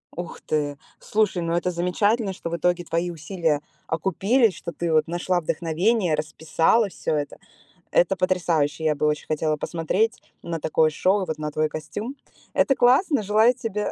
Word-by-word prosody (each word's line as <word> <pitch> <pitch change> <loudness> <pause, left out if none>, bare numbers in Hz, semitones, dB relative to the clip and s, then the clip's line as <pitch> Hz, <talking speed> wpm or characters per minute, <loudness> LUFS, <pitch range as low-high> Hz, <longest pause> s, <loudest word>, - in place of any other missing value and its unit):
Ух 175 0 -7
ты! 145 -2 -1 0.2
Слушай, 210 -4 0
ну 170 0 -1
это 175 +1 0
замечательно, 195 +4 +1
что 170 - -6
в 170 - -2
итоге 175 +2 +1
твои 170 +2 -1
усилия 160 -2 -1 0.3
окупились, 195 - +2
что 170 - -7
ты 170 -1 -3
вот 155 0 +3
нашла 175 +1 0
вдохновение, 170 +4 +1
расписала 160 +8 +1
всё 155 - -2
это. 145 -1 -3 0.5
Это - - +3
потрясающе. 165 -5 0
Я 155 -1 +2
бы 150 - -1
очень 150 0 -1
хотела 155 0 0
посмотреть 190 +10 -1 0.2
на 165 -1 -3
такое 155 +1 +2
шоу, 190 +5 +1
и - - -3
вот 160 -1 -3
на 150 0 -3
твой 155 +1 0
костюм. 205 - -6 0.4
Это 270 - +3
классно. 260 - +3
Желаю 215 +5 +4
тебе 225 -5 -3
175 Hz, 170 wpm, -24 LUFS, 155-210 Hz, 0.5 s, Желаю